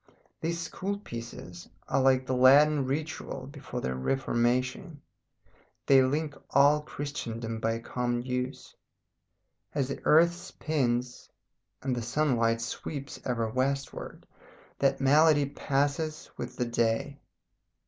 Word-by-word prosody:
These 165 +1 -2
school 190 +4 -3
pieces 115 - -9 0.2
are 135 0 +2
like 130 0 +3
the 130 - -1
Latin 140 +3 +6
ritual 155 +4 -4
before - - -7
the 65 - -2
Reformation, 125 - 0 0.9
they 135 -1 +6
link 145 +3 0 0.2
all 145 +2 +5
Christendom 115 -6 -5
by 115 0 0
a 115 - -3
common 120 0 -2
use. 125 +1 -4 1.0
As 140 -3 0
the 140 - -5
earth 170 +3 +5
spins, 130 -8 -2 0.5
and 130 -2 0
the 120 - -2
sunlight 115 -3 +1
sweeps 140 +4 -5
ever 115 -3 0
westward, 135 +4 -3 0.5
that 135 - +2
melody 145 +2 +5
passes 145 +3 -1
with 125 +1 -6
the 125 - -1
day. 120 +4 0
135 Hz, 115 wpm, -29 LUFS, 120-150 Hz, 1.0 s, Latin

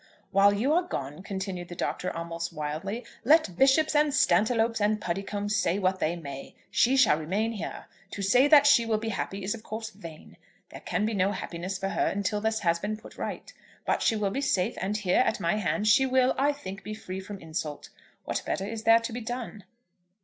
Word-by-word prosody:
"While 200 +1 +5
you 230 +9 +1
are 350 - +4
gone," 145 - -5
continued 190 -2 -5
the 175 - -8
Doctor 180 - -2
almost 170 0 -5
wildly, 165 +9 -4 0.2
"let 285 - +4
bishops 275 - +4
and 295 0 +4
Stantiloups 230 -5 +2
and 210 +1 +2
Puddicombes 205 +3 -3
say 180 -3 +1
what 185 -1 0
they 165 0 0
may, 140 -5 -8 0.2
she 260 +3 +3
shall 205 - +5
remain 200 +8 -1
here. 220 - -6 0.2
To 200 - -5
say 245 +8 +5
that 290 -1 +7
she 290 -5 +6
will 225 -1 0
be 225 +1 -4
happy 195 -1 -4
is 195 - -1
of 230 - -8
course 220 0 -6
vain. 165 -7 -12 0.3
There - - -10
can 210 - -1
be 220 - -1
no 195 0 +1
happiness 185 0 -5
for 195 0 -3
her 200 0 0
till 205 +1 -1
this 220 0 0
has 170 -3 +1
been 210 +3 -3
put 220 - -14
right. - - -5 0.3
But - - 0
she 225 - +2
will 205 -2 0
be 275 - -2
safe; 185 -9 +1
and 200 +3 -1
here, 190 -4 +1
at 220 - +2
my 170 +5 0
hand, 210 +2 -1
she 265 +5 +5
will, 260 0 +3
I 280 +2 +2
think, 195 -9 -8
be 215 - -6
free 190 -3 -6
from 200 +1 -8
insult. 155 -4 -5 0.4
What - - -2
better 190 - -2
is 220 +1 -6
there 225 0 +7
to 230 0 -5
be 245 - -4
done?" 230 -4 -6
205 Hz, 215 wpm, -27 LUFS, 185-230 Hz, 0.4 s, that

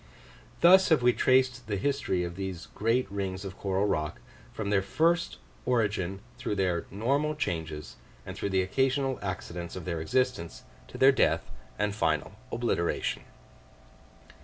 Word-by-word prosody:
Thus 185 +2 +7
have 155 -7 +4
we 125 0 +5
traced 130 -2 +2
the 105 - -1
history 95 -6 0
of 85 0 -5
these 95 -3 -5
great 115 +4 +1
rings 95 -1 -3
of 95 0 -6
coral 100 0 0
rock, 75 -7 -1 0.3
from 105 -2 -3
their 100 -2 +4
first 165 - +1 0.3
origin 100 -6 0 0.2
through 120 -4 -2
their 90 -3 0
normal 140 +9 0
changes, 80 - -4 0.3
and - - -7
through 100 - -2
the 95 -1 +2
occasional 130 +6 0
accidents 90 -3 -5
of 95 - -6
their 85 -3 -2
existence, 85 - -1 0.2
to - - -9
their 135 +1 +7
death 130 - +1 0.3
and 105 0 0
final 80 -7 0 0.2
obliteration. 115 -8 -1
100 Hz, 145 wpm, -29 LUFS, 90-130 Hz, 0.3 s, Thus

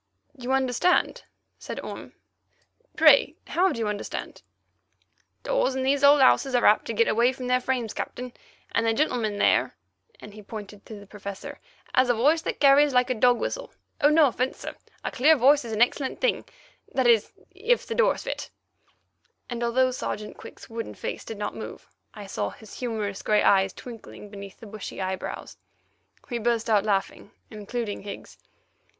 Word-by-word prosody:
"You 255 -1 -5
understand!" 265 +7 +1 0.3
said - - -6
Orme. - - -8 0.8
"Pray, - - +6
how 370 +2 +2
do - - -4
you 225 -2 -1
understand?" 210 -1 -5 1.0
"Doors - - +1
in 265 - -1
these 275 +1 +1
old 285 0 +7
houses 265 0 +4
are 245 - +3
apt 210 - +5
to 230 - -3
get 230 +2 +3
away 235 +3 +3
from 255 -1 -7
their 250 0 +2
frames, 245 -4 -2
Captain, 250 0 -6 0.4
and 230 - +1
the 225 - +2
gentleman 230 -8 0
there"—and 210 - -2
he 215 - -11
pointed 205 -1 -10
to 215 -2 -9
the 200 - -13
Professor—"has 210 - -4
a 245 - +3
voice 295 +8 +3
that - - -4
carries 280 0 +5
like 250 +1 +3
a - - +3
dog 245 +1 +3
whistle. - - -4 0.3
Oh, 290 - +6
no 305 0 +6
offence, 255 0 -1
sir. - - -7 0.3
A - - -3
clear 310 +5 +5
voice 280 +2 +4
is 230 - -7
an 220 +2 +4
excellent 265 +2 -2
thing—that 275 - -3
is, 230 -3 +4 0.2
if 440 +6 0
the - - -4
doors - - +2
fit"—and 240 -1 -10
although 255 +2 +2
Sergeant 210 -4 -5
Quick's - - -12
wooden 230 0 -6
face - - -5
did 225 - -7
not 205 0 -3
move, - - -8 0.3
I 205 -1 -8
saw 195 - -3
his 220 -2 -13
humorous 215 -5 -3
grey 210 -1 +2
eyes 195 -1 +4
twinkle 235 +1 -11 0.2
beneath 200 -1 -10
the - - -9
bushy 215 -1 -8
eyebrows. 190 0 -5 0.7
We 240 -2 -3
burst 230 0 0
out 210 -1 +3
laughing, 200 -1 -1 0.2
including 215 0 -5
Higgs. 200 0 -9
240 Hz, 170 wpm, -26 LUFS, 210-265 Hz, 1.0 s, old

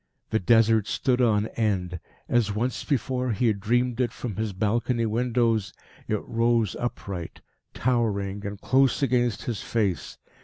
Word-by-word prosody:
The 110 - +2
Desert 110 +1 +4
stood 125 +7 +1
on 110 -3 +3
end. 95 -6 -1 0.3
As 115 -4 +2
once 120 +3 -1
before 130 -2 -1
he 115 +5 0
had 105 -3 +2
dreamed 120 +3 +1
it 120 -2 +1
from 120 -5 -5
his 110 +1 -2
balcony 115 +4 0
windows, 115 -2 +1 0.3
it 105 -1 -1
rose 115 -3 +1
upright, 100 -7 -5 0.3
towering, 105 -5 0
and 100 -1 -5
close 135 +3 +2
against 120 -4 +1
his 115 -4 -3
face. 100 -8 -1
115 Hz, 145 wpm, -26 LUFS, 105-120 Hz, 0.3 s, Desert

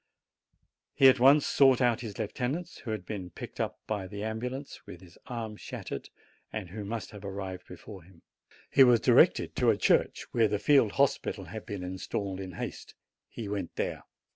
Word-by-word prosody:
He 135 - +7
at 130 - +3
once 140 +4 +6
sought 135 -3 +5
out 120 -3 +2
his 110 -5 -7
lieutenant, 130 - -3
who - - -5
had 105 -4 -3
been 95 -2 -5
picked - - -10
up - - -2
by 100 -3 -3
the 100 +1 -6
ambulance, 125 +5 -5
with 85 - -9
his 90 -2 -16
arm 115 -4 -5
shattered, - - -7 0.4
and 100 -5 -5
who 105 +3 -6
must 110 +2 -5
have 105 -2 -11
arrived 95 -2 -6
before 95 +2 -10
him. 85 0 -20 0.5
He 135 - +7
was 120 -2 +6
directed - - +4
to - - +3
a - - +3
church, - - +2
where 115 -2 +3
the 105 0 0
field 135 -2 +4
hospital 140 -1 +1
had - - -8
been 100 -3 -5
installed 95 +1 -4
in 95 -1 -6
haste. - - -7 0.3
He 115 - -6
went 100 -4 -4
there. - - -2
105 Hz, 185 wpm, -29 LUFS, 95-125 Hz, 0.5 s, He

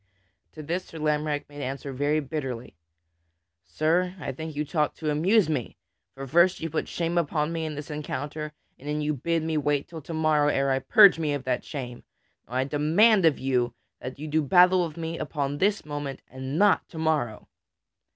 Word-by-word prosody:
To 155 - -8
this 175 +5 -3
Sir 165 - -11
Lamorack 150 -1 -1
made 145 0 -9
answer 135 +1 -5
very 145 +3 +1
bitterly: 135 - -5 0.9
"Sir, 180 +4 0
I 135 -3 -4
think 160 +3 -7
you 150 +1 -1
talk 150 0 0
to 155 -2 -2
amuse 185 +7 +3
me; 145 -7 -3 0.4
for 135 0 -6
first 170 +6 +3
you 165 -1 -4
put 160 - -2
shame 170 0 -1
upon 150 0 -1
me 165 -1 -2
in 155 - -5
this 145 +1 -7
encounter, 150 +1 -4 0.3
and 140 - -11
then 150 0 -1
you 150 0 0
bid 165 +4 -1
me 160 -1 -1
wait 145 -1 +1
until 165 -2 -10
to 165 - -8
morrow 155 -2 +3
ere 140 -2 +1
I 135 - +2
purge 195 - +6
me 150 -3 0
of 140 - -5
that 130 -1 -1
shame. 125 -5 -6 0.5
Now 125 - -8
I 130 - +2
demand 165 +9 +4
of 160 -3 +4
you 125 -2 0 0.3
to 130 - -4
do 150 +4 -2
battle 180 +4 +5
with 155 - -12
me 165 0 -4
upon 145 -2 -3
this 205 -3 +1
moment 145 -2 -5
and 130 +2 -5
not 205 +1 +3
to 165 - -11
morrow." 155 -9 -1
150 Hz, 195 wpm, -26 LUFS, 140-165 Hz, 0.9 s, purge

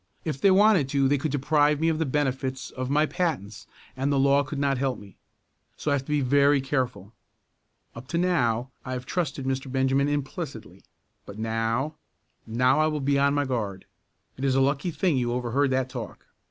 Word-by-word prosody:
If 150 -4 -3
they 200 - +5
wanted 190 -7 +4
to 135 -1 +2
they 140 +1 +2
could 150 +1 -2
deprive 145 +1 +2
me 160 - +1
of 160 -1 +1
the 160 - 0
benefits 130 -2 -2
of 130 0 -4
my 150 +2 +3
patents 140 - -3 0.3
and 135 +2 -1
the 140 - +2
law 140 +1 +4
could 145 +1 -5
not 140 -2 0
help 130 -3 -1
me. 100 -3 -14 0.6
So 150 - -2
I - - +4
have 135 -1 -1
to - - -14
be 150 -1 +2
very 140 +2 +4
careful. 125 -7 -3 0.8
Up 115 +2 -10
to 170 - -2
now 130 -9 +1
I 130 - -5
have 125 0 -5
trusted 145 -4 -2
Mr. 135 0 -2
Benjamin 135 +1 +2
implicitly, 145 +2 -5 0.5
but 100 - -9
now 115 +6 -1 0.5
now 125 +5 +2
I 155 - +4
will 155 -1 -1
be 140 0 +1
on 140 +1 +3
my 145 0 +1
guard. 105 -7 -3 0.5
It 130 - -7
is 135 -1 +2
a - - +3
lucky 140 +5 +1
thing 170 -3 0
you 120 -1 0
overheard 125 +3 0
that 130 0 0
talk." 125 -3 -8
135 Hz, 200 wpm, -26 LUFS, 130-145 Hz, 0.8 s, they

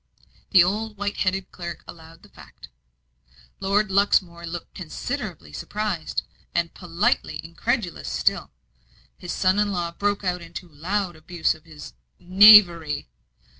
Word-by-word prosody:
The 185 -3 +7
old 210 +3 -2
white 205 0 -3
headed 190 0 -1
clerk 170 -2 -7
allowed 165 0 -13
the - - -17
fact. - - -15 0.9
Lord 200 +1 +1
Luxmore 180 -3 +1
looked 170 +1 -7
considerably 75 - -6
surprised, 185 - -3 0.3
and 170 -1 0
politely 180 - -1
incredulous 185 +3 -3
still. - - 0 0.7
His 180 - -6
son 185 +1 +2
in 210 -1 +1
law 175 -3 -2
broke 205 +3 -1
out 180 -1 -1
into 170 +2 -9
loud 175 +4 -3
abuse 160 +1 -1
of 155 0 -18
this 155 -2 -11 0.2
"knavery." 180 - +6
180 Hz, 130 wpm, -24 LUFS, 165-200 Hz, 0.9 s, The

